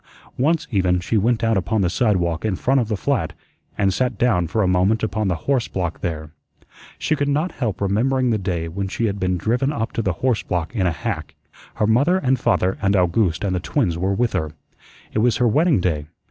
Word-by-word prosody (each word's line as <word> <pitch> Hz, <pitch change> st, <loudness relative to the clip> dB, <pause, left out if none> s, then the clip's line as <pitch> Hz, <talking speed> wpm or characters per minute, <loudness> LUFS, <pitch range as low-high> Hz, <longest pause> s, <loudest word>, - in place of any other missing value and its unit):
Once, 155 Hz, +5 st, +1 dB
even, 90 Hz, -4 st, +2 dB
she 95 Hz, +6 st, -2 dB
went 115 Hz, +2 st, +2 dB
out 115 Hz, 0 st, +2 dB
upon 100 Hz, +3 st, 0 dB
the 90 Hz, -, +2 dB
sidewalk 90 Hz, -5 st, 0 dB
in 110 Hz, -3 st, 0 dB
front 135 Hz, +8 st, +2 dB
of 115 Hz, -, -2 dB
the 105 Hz, -2 st, -2 dB
flat -, -, -1 dB, 0.4 s
and 95 Hz, -2 st, +2 dB
sat 125 Hz, -1 st, -1 dB
down 95 Hz, -8 st, +2 dB
for 105 Hz, +6 st, 0 dB
a -, -, +2 dB
moment 95 Hz, +5 st, +2 dB
upon 110 Hz, 0 st, -1 dB
the 90 Hz, -, +1 dB
horse 135 Hz, -4 st, +1 dB
block 90 Hz, -3 st, -3 dB
there. 80 Hz, -4 st, -4 dB, 0.7 s
She -, -, 0 dB
could 145 Hz, -1 st, -1 dB
not 150 Hz, +5 st, 0 dB
help 110 Hz, -7 st, -3 dB
remembering 120 Hz, +6 st, +1 dB
the 110 Hz, -, +1 dB
day 90 Hz, -4 st, -2 dB
when 95 Hz, +4 st, -3 dB
she 115 Hz, +4 st, -2 dB
had 100 Hz, -2 st, -2 dB
been 90 Hz, -1 st, 0 dB
driven 125 Hz, -, 0 dB
up 115 Hz, -6 st, -3 dB
to -, -, -2 dB
that 95 Hz, -5 st, 0 dB
horse 125 Hz, +6 st, 0 dB
block 90 Hz, +4 st, -3 dB
in 95 Hz, -5 st, +1 dB
a -, -, +1 dB
hack. 80 Hz, -, -4 dB, 0.4 s
Her 105 Hz, -, +1 dB
mother 140 Hz, -, +3 dB
and 130 Hz, -7 st, +1 dB
father 95 Hz, -4 st, +1 dB
and 100 Hz, 0 st, +2 dB
Owgooste 90 Hz, -1 st, +1 dB
and 95 Hz, -2 st, 0 dB
the -, -, 0 dB
twins 85 Hz, 0 st, 0 dB
were 95 Hz, +3 st, 0 dB
with 120 Hz, +2 st, 0 dB
her. 80 Hz, -4 st, -1 dB, 0.6 s
It -, -, 0 dB
was 120 Hz, +1 st, +3 dB
her 125 Hz, -, +3 dB
wedding 150 Hz, -, +3 dB
day. 75 Hz, -5 st, -1 dB
100 Hz, 225 wpm, -21 LUFS, 90-120 Hz, 0.7 s, mother